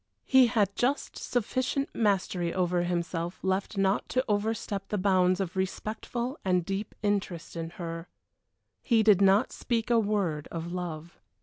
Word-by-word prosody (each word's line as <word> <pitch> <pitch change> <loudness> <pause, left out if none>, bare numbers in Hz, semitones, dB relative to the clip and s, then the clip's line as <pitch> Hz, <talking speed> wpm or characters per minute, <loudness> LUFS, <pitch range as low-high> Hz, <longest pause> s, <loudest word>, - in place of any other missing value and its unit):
He 260 -2 +6
had 210 -4 +1
just 270 +4 0
sufficient 255 +3 -1
mastery 190 -5 +1
over 180 -1 +1
himself 175 0 -2
left 190 +2 -1
not 195 +1 +1
to 255 +1 +1
overstep 205 -2 -1
the 210 - -2
bounds 185 -1 +3
of 190 -2 -3
respectful 220 - -3
and 180 -2 +1
deep 195 +2 -4
interest 200 -6 -1
in 165 -1 -4
her. 165 -1 -5 0.7
He 230 -4 +3
did 205 -3 +5
not 195 +4 +4
speak 235 -1 -2
a 235 - +5
word 200 -8 0
of 170 +1 -5
love. 170 -2 -6
195 Hz, 145 wpm, -28 LUFS, 175-220 Hz, 0.7 s, He